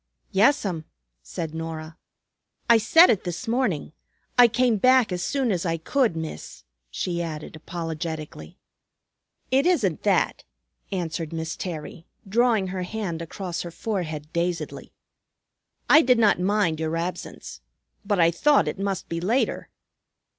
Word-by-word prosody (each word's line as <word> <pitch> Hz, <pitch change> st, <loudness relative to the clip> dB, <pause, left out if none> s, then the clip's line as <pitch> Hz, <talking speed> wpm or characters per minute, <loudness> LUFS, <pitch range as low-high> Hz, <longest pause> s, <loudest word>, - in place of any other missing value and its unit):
"Yes'm," 195 Hz, -, +2 dB, 0.4 s
said 155 Hz, -, -6 dB
Norah. 160 Hz, 0 st, -6 dB, 0.7 s
"I 235 Hz, -1 st, +6 dB
set 325 Hz, +11 st, +6 dB
it 210 Hz, -, 0 dB
this 175 Hz, +6 st, -5 dB
morning. 225 Hz, -, -1 dB, 0.4 s
I 245 Hz, -1 st, +8 dB
came 235 Hz, 0 st, +2 dB
back 255 Hz, 0 st, +4 dB
as 180 Hz, -1 st, -2 dB
soon 265 Hz, +3 st, 0 dB
as 180 Hz, -3 st, -1 dB
I 165 Hz, -2 st, -1 dB
could, 230 Hz, -, +1 dB
Miss," 155 Hz, -, -7 dB, 0.3 s
she 175 Hz, -, -2 dB
added 155 Hz, -2 st, -6 dB
apologetically. 160 Hz, -, -6 dB, 0.9 s
"It 270 Hz, +5 st, +3 dB
isn't 220 Hz, -, +1 dB
that," 200 Hz, -2 st, +1 dB, 0.5 s
answered 165 Hz, -3 st, -3 dB
Miss 160 Hz, 0 st, -4 dB
Terry, 165 Hz, -1 st, -7 dB, 0.2 s
drawing 220 Hz, -2 st, +2 dB
her 185 Hz, 0 st, -4 dB
hand 180 Hz, -3 st, -4 dB
across 175 Hz, +1 st, -5 dB
her 175 Hz, -, -6 dB
forehead 165 Hz, -5 st, -4 dB
dazedly. 170 Hz, 0 st, -3 dB, 1.0 s
"I 305 Hz, -, +8 dB
did 250 Hz, -3 st, +4 dB
not 215 Hz, -5 st, +4 dB
mind 180 Hz, -4 st, +1 dB
your 160 Hz, +1 st, -1 dB
absence. 175 Hz, +2 st, -6 dB, 0.4 s
But 200 Hz, -1 st, 0 dB
I 165 Hz, 0 st, +5 dB
thought 290 Hz, -, +3 dB
it -, -, -3 dB
must 195 Hz, -2 st, -2 dB
be 165 Hz, 0 st, -4 dB
later." 230 Hz, +9 st, 0 dB
180 Hz, 135 wpm, -25 LUFS, 165-220 Hz, 1.0 s, I